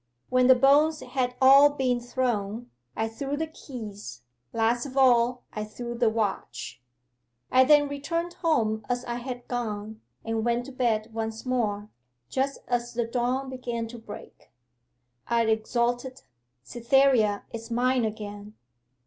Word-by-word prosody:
When 255 Hz, 0 st, +4 dB
the 260 Hz, -, +8 dB
bones 290 Hz, +4 st, +4 dB
had 250 Hz, -1 st, -2 dB
all 275 Hz, +2 st, +8 dB
been 255 Hz, -3 st, 0 dB
thrown, 240 Hz, -2 st, -2 dB, 0.2 s
I 220 Hz, -, -1 dB
threw 275 Hz, +6 st, -4 dB
the 320 Hz, -, -1 dB
keys; 215 Hz, -, -9 dB, 0.3 s
last 235 Hz, +3 st, +1 dB
of 270 Hz, 0 st, -9 dB
all 245 Hz, -1 st, +4 dB
I 215 Hz, -, -3 dB
threw 235 Hz, +3 st, -6 dB
the 235 Hz, -1 st, +3 dB
watch. 125 Hz, -, -3 dB, 0.7 s
'I 260 Hz, 0 st, +6 dB
then 290 Hz, +1 st, +5 dB
returned 335 Hz, +5 st, -3 dB
home 225 Hz, -12 st, 0 dB
as 245 Hz, 0 st, -1 dB
I 240 Hz, 0 st, -3 dB
had 245 Hz, 0 st, -7 dB
gone, 220 Hz, -2 st, -4 dB, 0.2 s
and 225 Hz, -1 st, -1 dB
went 240 Hz, +1 st, 0 dB
to 275 Hz, -, -9 dB
bed 230 Hz, -4 st, -1 dB
once 225 Hz, +1 st, -4 dB
more, 215 Hz, -5 st, -1 dB, 0.4 s
just 275 Hz, +1 st, -1 dB
as 240 Hz, -1 st, -2 dB
the 235 Hz, -1 st, 0 dB
dawn 250 Hz, +3 st, -1 dB
began 240 Hz, -3 st, -4 dB
to 240 Hz, 0 st, -9 dB
break. 225 Hz, -2 st, -12 dB, 0.8 s
I 235 Hz, 0 st, +2 dB
exulted 240 Hz, +3 st, -1 dB, 0.4 s
"Cytherea 235 Hz, -, +2 dB
is 230 Hz, 0 st, -7 dB
mine 250 Hz, +1 st, +1 dB
again!" 210 Hz, -1 st, -6 dB
240 Hz, 140 wpm, -27 LUFS, 220-260 Hz, 0.8 s, the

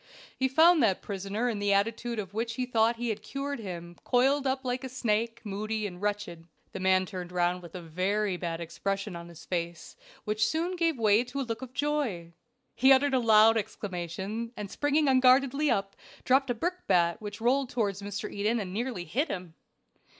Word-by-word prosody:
He 265 Hz, -, +1 dB
found 320 Hz, +4 st, +5 dB
that 200 Hz, -6 st, +2 dB
prisoner 200 Hz, +4 st, -3 dB
in 225 Hz, -4 st, -1 dB
the 205 Hz, 0 st, +2 dB
attitude 230 Hz, +4 st, 0 dB
of 200 Hz, -2 st, -5 dB
which 230 Hz, +1 st, -2 dB
he 255 Hz, -, -1 dB
thought 230 Hz, -1 st, +2 dB
he 240 Hz, 0 st, -3 dB
had 215 Hz, -1 st, -3 dB
cured 280 Hz, +5 st, -4 dB
him, 175 Hz, -4 st, -7 dB
coiled 270 Hz, +3 st, +2 dB
up 265 Hz, 0 st, -1 dB
like 250 Hz, +1 st, -2 dB
a 260 Hz, -, -5 dB
snake, 230 Hz, -2 st, -1 dB
moody 215 Hz, +1 st, -3 dB
and 180 Hz, -2 st, -7 dB
wretched. 205 Hz, -5 st, -3 dB, 0.2 s
The -, -, -6 dB
man 185 Hz, 0 st, +3 dB
turned 180 Hz, -3 st, -7 dB
round 180 Hz, 0 st, 0 dB
with 170 Hz, -1 st, -12 dB
a 180 Hz, -, -6 dB
very 190 Hz, +4 st, 0 dB
bad 170 Hz, -2 st, -4 dB
expression 195 Hz, +3 st, -3 dB
on 170 Hz, 0 st, -8 dB
his 170 Hz, -1 st, -13 dB
face, 170 Hz, -2 st, -4 dB, 0.3 s
which 215 Hz, +1 st, 0 dB
soon 340 Hz, +3 st, 0 dB
gave 330 Hz, -4 st, +1 dB
way 215 Hz, 0 st, +4 dB
to 250 Hz, +3 st, -5 dB
a -, -, 0 dB
look 230 Hz, -1 st, -4 dB
of 255 Hz, -1 st, -8 dB
joy. 275 Hz, -, -1 dB, 0.4 s
He 265 Hz, +3 st, +5 dB
uttered 270 Hz, +1 st, +5 dB
a 260 Hz, -, +4 dB
loud 225 Hz, -1 st, +6 dB
exclamation, 200 Hz, +3 st, -4 dB
and 205 Hz, -2 st, -6 dB
springing 290 Hz, +1 st, +1 dB
unguardedly 270 Hz, +2 st, +4 dB
up, 195 Hz, -3 st, 0 dB, 0.3 s
dropped 265 Hz, +1 st, +3 dB
a 245 Hz, -, +1 dB
brickbat 200 Hz, -, +1 dB
which 210 Hz, 0 st, -7 dB
rolled 255 Hz, +3 st, +2 dB
toward 215 Hz, -5 st, 0 dB
Mr. 205 Hz, 0 st, -5 dB
Eden 215 Hz, +4 st, 0 dB
and 185 Hz, -3 st, -5 dB
nearly 225 Hz, -4 st, -3 dB
hit 255 Hz, -, 0 dB
him. 180 Hz, -, -6 dB
215 Hz, 195 wpm, -29 LUFS, 190-255 Hz, 0.4 s, loud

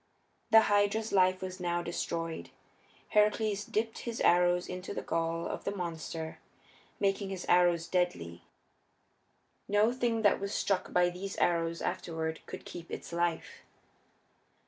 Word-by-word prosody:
The 225 Hz, -1 st, +8 dB
Hydra's 205 Hz, +1 st, +2 dB
life 185 Hz, -1 st, +3 dB
was 185 Hz, 0 st, -5 dB
now 175 Hz, -1 st, -1 dB
destroyed. 165 Hz, -1 st, -3 dB, 0.6 s
Heracles 210 Hz, 0 st, +2 dB
dipped 225 Hz, +2 st, -2 dB
his 235 Hz, -1 st, -5 dB
arrows 175 Hz, 0 st, +4 dB
into 180 Hz, +2 st, -6 dB
the -, -, -3 dB
gall 165 Hz, 0 st, -1 dB
of -, -, -4 dB
the 200 Hz, -, -3 dB
monster, 165 Hz, -3 st, -5 dB, 0.6 s
making 195 Hz, 0 st, 0 dB
his 190 Hz, -2 st, -5 dB
arrows 175 Hz, -2 st, +4 dB
deadly; 90 Hz, -, -1 dB, 1.3 s
no 205 Hz, +3 st, +3 dB
thing 235 Hz, -3 st, 0 dB
that 205 Hz, -, +4 dB
was 200 Hz, +1 st, -3 dB
struck 195 Hz, -2 st, 0 dB
by 175 Hz, 0 st, +3 dB
these 195 Hz, +3 st, -6 dB
arrows 165 Hz, -1 st, +1 dB
afterward 160 Hz, -3 st, -3 dB
could -, -, -8 dB
keep 170 Hz, -1 st, -9 dB
its -, -, -7 dB
life. 170 Hz, -1 st, -1 dB
180 Hz, 135 wpm, -31 LUFS, 170-205 Hz, 1.3 s, The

